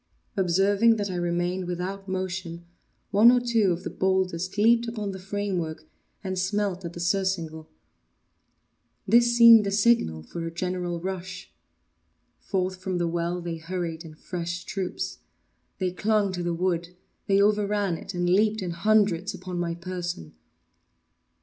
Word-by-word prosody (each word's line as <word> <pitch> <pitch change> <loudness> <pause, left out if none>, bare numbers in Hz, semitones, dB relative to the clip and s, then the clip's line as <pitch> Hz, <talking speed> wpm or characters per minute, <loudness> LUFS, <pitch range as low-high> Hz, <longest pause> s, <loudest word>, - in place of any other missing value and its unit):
Observing 195 +5 +3
that 205 -3 -2
I - - -4
remained 175 +1 -1
without 185 +3 -4
motion, 185 -2 -4 0.5
one 215 +4 +7
or 250 - +4
two 230 -5 +2
of 175 +1 -3
the - - -5
boldest 190 -1 -1
leaped 230 +3 +4
upon 215 -3 -3
the 190 - -7
frame 200 0 -2
work, 155 -1 -5 0.4
and 190 -1 -2
smelt 195 0 -1
at 170 0 -6
the 175 - -8
surcingle. 170 -3 -1 1.4
This 235 +1 +4
seemed 230 -2 +9
the 200 - -1
signal 200 - +2
for 165 - -6
a 165 - -3
general 175 0 -3
rush. 185 +1 -6 0.9
Forth 185 -1 -2
from 185 0 -3
the 175 -1 0
well 170 +1 -2
they 170 -1 -4
hurried 165 0 -4
in 155 -2 -11
fresh 170 +1 -5
troops. 190 0 -4 0.6
They 185 -1 -1
clung 205 +1 +1
to 180 -1 -4
the 175 -1 -1
wood—they 180 +2 -2
overran 205 -2 +2
it, 180 - -8
and 175 0 0
leaped 210 +3 +2
in 180 - -3
hundreds 200 +1 +2
upon 180 -1 -6
my 170 -1 -2
person. 175 - -5
185 Hz, 150 wpm, -26 LUFS, 175-200 Hz, 1.4 s, seemed